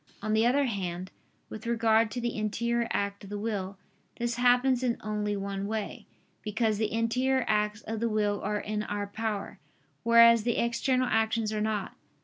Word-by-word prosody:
On 215 +1 -2
the 220 +2 +4
other 280 +3 +3
hand, 185 -5 -4 0.4
with 220 - -8
regard 225 -1 +3
to 225 - -4
the 240 -1 -2
interior 235 +2 -1
act 200 0 -2
of 200 - -10
the 205 - -4
will, 200 -3 -3 0.4
this 240 0 -1
happens 245 +1 +3
in 245 -2 0
only 210 -1 -2
one 195 0 -3
way: 215 -1 -4 0.3
because 215 0 0
the 220 -1 0
interior 250 +3 +1
acts 210 0 +1
of 220 0 -4
the 230 +1 0
will 210 -2 0
are 210 +1 -1
in 210 0 -3
our 205 -1 -3
power, 210 0 -4 0.4
whereas 230 0 +7
the 235 +1 0
external 255 +2 +1
actions 225 -1 +1
are 210 - -1
not. 215 -2 -2
220 Hz, 175 wpm, -29 LUFS, 210-235 Hz, 0.4 s, whereas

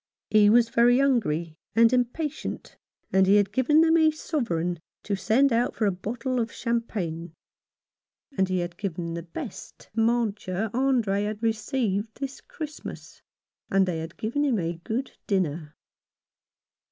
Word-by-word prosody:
He 210 -1 +6
was 230 +1 +5
very 240 +1 +4
hungry 170 - +1 0.2
and 230 +1 +5
impatient, 270 +5 -2 0.4
and 190 0 +5
he 200 - +6
had 205 -1 +3
given 260 +7 +4
them 325 0 +5
a 315 -1 +5
sovereign 180 - -2 0.2
to 200 - -1
send 235 +7 +3
out 235 +1 +1
for 220 - 0
a 200 - +3
bottle 235 +7 -3
of 230 -1 -1
champagne; 180 -9 -3 1.0
and 190 -5 +1
he 185 -1 +1
had 175 0 -5
given 175 -4 -4
the 170 - -4
best 170 0 -9
mancia 220 -3 0
Andre 235 -6 +1
had 215 +1 -5
received 220 -2 -1
this 275 -1 -5
Christmas. 310 -2 -8 0.5
And 195 0 +3
they 175 -3 -2
had 160 +1 -7
given 240 +7 -1
him 265 -6 +2
a 170 -2 -3
good 250 +5 -3 0.2
dinner. 160 -6 -1
220 Hz, 145 wpm, -26 LUFS, 185-245 Hz, 1.0 s, He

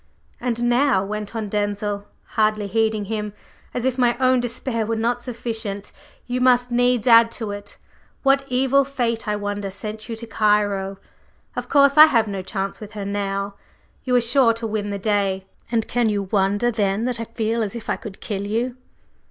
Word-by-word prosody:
"And 240 -1 -1
now," 240 -4 +3
went 210 +2 -5
on 220 -2 -2
Denzil, 205 0 -2 0.2
hardly 215 -1 +1
heeding 220 0 0
him, 210 0 -3 0.4
"as 245 - -3
if 260 0 0
my 240 -1 +3
own 255 -1 +4
despair 240 -1 -2
were 225 +1 -1
not 235 +2 0
sufficient, 225 -4 -4 0.3
you 250 0 -2
must 250 -1 +4
needs 245 -1 +2
add 230 -1 +7
to 220 -4 -4
it! 205 0 -8 0.5
What 275 0 +4
evil 265 +2 +3
fate, 240 -5 -2
I 210 - +1
wonder, 205 -1 -3
sent 215 +3 -6
you 230 - -3
to 230 +1 -6
Cairo! 205 -3 +1 0.6
Of - - -4
course, 280 +1 +5
I 310 - +13
have 230 -8 +2
no 195 -2 -3
chance 195 +1 -4
with 210 0 -10
her 205 -2 -5
now; 200 0 -2 0.5
you 250 -1 +1
are 245 - +5
sure 235 0 +4
to 230 0 -5
win 210 -2 -2
the 200 - -2
day. 195 -2 0 0.3
And 225 -2 0
can 240 -2 +1
you 205 -1 0
wonder 200 +4 +1
then 205 0 0
that 245 -2 -2
I 230 - -3
feel 225 +1 -2
as 215 +1 -2
if 230 - -7
I - - +1
could 200 -3 -9
kill 200 -2 -4
you?" 240 +4 -1
220 Hz, 190 wpm, -22 LUFS, 205-240 Hz, 0.6 s, I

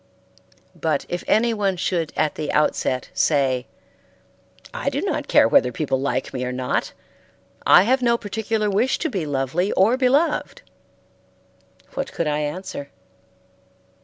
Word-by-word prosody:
But 160 -4 -1
if 175 - -3
anyone 210 -4 +1
should 170 -3 -1
at 155 - +1
the 155 - -4
outset 130 -4 0
say, 135 -4 +1 1.1
"I - - -1
do - - -3
not - - -2
care - - +5
whether 125 - +4
people 135 0 -2
like 135 -1 -2
me 125 -1 -3
or 125 - -2
not, 125 0 -2 0.7
I 180 - +8
have 255 +5 +2
no 235 -1 +3
particular 215 0 -2
wish 210 +6 +1
to 320 - -2
be 185 -8 -3
lovely 145 +7 -1
or 220 +7 +3
beloved," 285 - +1 1.3
what 275 0 -4
could 170 - -2
I 150 0 0
answer? 150 -1 -5
175 Hz, 135 wpm, -22 LUFS, 140-220 Hz, 1.3 s, I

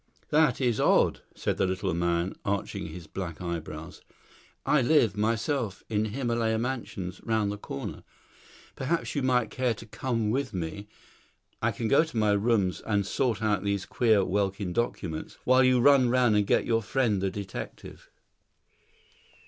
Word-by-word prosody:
"That 150 -5 +3
is 120 -4 +1
odd," - - +3
said - - -2
the 95 - +2
little 95 -3 -1
man, 85 +1 0
arching 100 -1 -2
his 90 -2 -9
black 85 -1 -6
eyebrows. 85 -1 -6 0.6
"I 150 - +4
live, 120 -6 +3
myself, 110 0 -1
in 105 -1 +1
Himylaya 115 -1 0
Mansions, 110 -7 -4
round 110 -3 0
the 105 - -5
corner. 70 - -6 0.7
Perhaps 165 +6 -1
you 145 - -1
might 125 -4 +1
care 125 -3 0
to 115 - -11
come 110 0 -2
with 130 -3 -2
me; 90 +4 -4 0.7
I - - +2
can 115 - -3
go 140 +7 +5
to 160 -7 -7
my 105 -1 +3
rooms 100 -4 +1
and 100 -2 0
sort 115 +2 0
out 105 -3 +1
these 100 -1 -1
queer 110 -5 +3
Welkin 95 -1 -1
documents, 95 -8 -3
while 130 +1 +5
you 130 -1 +4
run 130 -1 +5
round 120 -3 +3
and 105 -1 +2
get - - +2
your 115 -1 +2
friend 110 -3 0
the 95 - +1
detective." 95 0 -8
110 Hz, 155 wpm, -28 LUFS, 95-125 Hz, 0.7 s, go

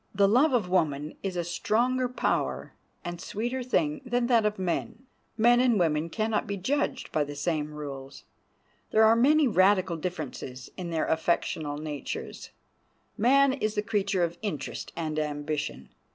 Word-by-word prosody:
The 200 0 +5
love 255 +9 +4
of 235 -7 +1
woman 155 -5 0
is 195 -2 -3
a 175 - 0
stronger 245 +9 0
power 250 - -1 0.3
and 175 0 -5
a - - -9
sweeter 240 +5 -3
thing 295 +4 0
than 245 -1 0
that 235 -3 +4
of 210 - -3
man. 190 +7 -3 0.3
Men 240 +2 +5
and 245 -3 +3
women 160 -1 +1
can 215 +5 -1
not 215 - 0
be 200 0 -3
judged 265 +5 -1
by 155 - +1
the 145 0 -7
same 150 0 -1
rules. 140 -2 -8 0.7
There 220 - +4
are 220 +1 +6
many 290 +5 +4
radical 185 -4 +3
differences 150 -6 -6
in 180 -2 -5
their 165 -2 0
affectional 160 -2 0
natures. 150 -2 -6 0.7
Man 270 +4 +4
is 215 -5 -2
the 210 - 0
creature 200 -3 0
of 170 0 -2
interest 200 -9 -4
and 155 -2 -2
ambition. 145 - -3
190 Hz, 165 wpm, -28 LUFS, 155-240 Hz, 0.7 s, are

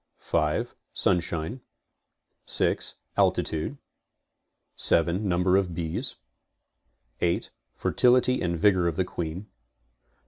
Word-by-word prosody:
5. 75 -2 -1 0.2
Sunshine. 85 +5 0 0.9
6. - - +1 0.2
Altitude. 80 - 0 1.0
7. 85 +5 +3
Number 90 +1 +3
of 90 -4 -1
bees. 80 -2 -3 1.1
8. 85 0 0 0.2
Fertility 125 +1 +3
and 85 -2 -1
vigor 95 -1 +3
of 85 - -1
the 95 - 0
queen. 85 +2 -5
90 Hz, 90 wpm, -26 LUFS, 85-95 Hz, 1.1 s, 7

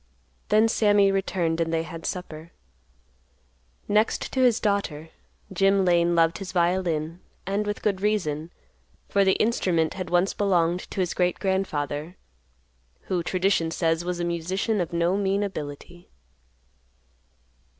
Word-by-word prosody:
Then 215 +1 +5
Sammy 205 -3 +3
returned 175 -4 -1
and 165 0 -1
they 165 0 0
had 165 0 -7
supper. 170 -3 -7 1.3
Next 215 +2 +1
to 265 - -1
his 245 -3 +4
daughter, 185 -7 -1 0.4
Jim 195 +1 +3
Lane 175 -1 +3
loved 165 0 +2
his 195 -2 -7
violin, 170 -2 0 0.3
and 200 +2 -1
with 205 - -4
good 195 -3 0
reason, 170 -7 -1 0.6
for 200 - +3
the 190 -1 +4
instrument 180 -8 +1
had 185 -2 -5
once 175 +2 +2
belonged 180 -3 0
to 190 - -2
his 180 - -1
great 180 -1 0
grandfather, 170 -4 -2 0.8
who, 180 -2 -2
tradition 180 -1 +1
says, 165 0 0
was 175 0 -3
a 175 - -1
musician 180 +5 -1
of 170 - -3
no 170 +2 +1
mean 200 0 0
ability. 175 -1 -7
180 Hz, 135 wpm, -25 LUFS, 165-195 Hz, 1.3 s, Then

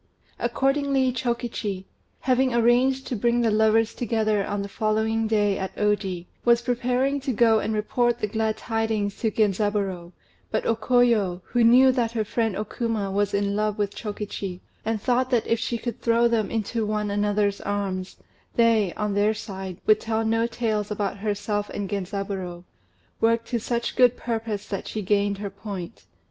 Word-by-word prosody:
Accordingly 275 -1 +1
Chokichi, 235 -5 -3 0.4
having 255 -1 +2
arranged 250 +3 +3
to 250 - -3
bring 235 +3 +2
the 230 -2 +2
lovers 220 +1 +3
together 220 -4 0
on 200 0 -2
the - - -5
following 220 +1 0
day 205 -2 +2
at 190 - -4
Oji, 195 -4 0 0.2
was 235 0 +4
preparing 250 +3 0
to 270 0 -2
go 225 -1 +4
and 220 - -2
report 235 +3 +1
the 230 - -1
glad 220 +1 -1
tidings 220 -3 -1
to 225 - +1
Genzaburô; 200 -4 0 0.4
but - - -1
O 230 - +2
Koyo, 225 -6 +2
who 240 -1 +1
knew 255 +3 +7
that 240 -3 0
her 225 -2 0
friend 225 -1 -1
O 210 - -1
Kuma 220 -3 -2
was 200 0 0
in 200 0 0
love 210 0 0
with 205 -1 -1
Chokichi, 205 -3 -5 0.2
and 225 -1 -1
thought 255 +4 +1
that 245 -4 +2
if 230 - +1
she 235 - -2
could 235 0 -5
throw 235 0 +3
them 225 -3 0
into 225 +1 -2
one 210 -1 -1
another's 205 0 +1
arms, 195 -2 -3 0.4
they, 225 -5 +3
on 210 -1 -1
their 205 +2 +2
side, 190 -4 -6
would 215 0 +5
tell 225 0 -1
no 225 +1 +2
tales 220 -3 -1
about 205 -1 -2
herself 205 0 -2
and 205 -1 -4
Genzaburô, 195 -2 -4 0.6
worked 230 0 +2
to 240 - 0
such 235 +1 -2
good 250 -1 +5
purpose 225 -3 -3
that 195 - -4
she 215 - -4
gained 200 +1 +1
her 200 -1 -5
point. 200 -1 -7
215 Hz, 170 wpm, -25 LUFS, 205-235 Hz, 0.6 s, knew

